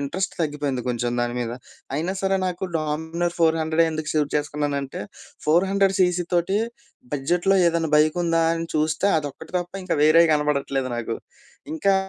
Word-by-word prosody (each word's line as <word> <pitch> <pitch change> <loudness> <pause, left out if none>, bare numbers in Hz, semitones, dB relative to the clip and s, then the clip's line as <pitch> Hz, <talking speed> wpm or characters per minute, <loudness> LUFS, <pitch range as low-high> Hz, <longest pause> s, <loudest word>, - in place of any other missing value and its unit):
Interest 175 +8 -2
తగ్గిపోయింది 145 -4 -2
కొంచెం 120 0 -1
దాని 120 0 -1
మీద. 120 -1 -3 0.4
అయినా 170 +5 -1
సరే, 195 0 +2
నాకు 180 +1 -3
డామినోర్ 160 +3 -2
ఫోర్ 165 -1 +3
హండ్రెడె 160 +1 +2
ఎందుకు 155 0 -3
సెలెక్ట్ 150 -2 0
చేసుకున్నానంటే, 145 -2 -3 0.5
400 195 +4 +3
సీసీ 180 -1 +2
తోటి 175 +4 +2 0.5
బడ్జెట్‌లో 175 +7 +1
ఏదైనా 165 -1 0
బైక్ 155 +2 +3
ఉందా? 165 0 +2
అని 165 0 -3
చూస్తే 155 +4 +1
అదొక్కటి 145 +2 -8
తప్ప 175 0 -6
ఇంకా 180 - 0
వేరేయి 165 +2 +6
కనపడట్లేదు 140 -3 0
నాకు. 115 -1 -3 0.6
ఇంకా 200 -11 +2
160 Hz, 150 wpm, -23 LUFS, 145-175 Hz, 0.6 s, వేరేయి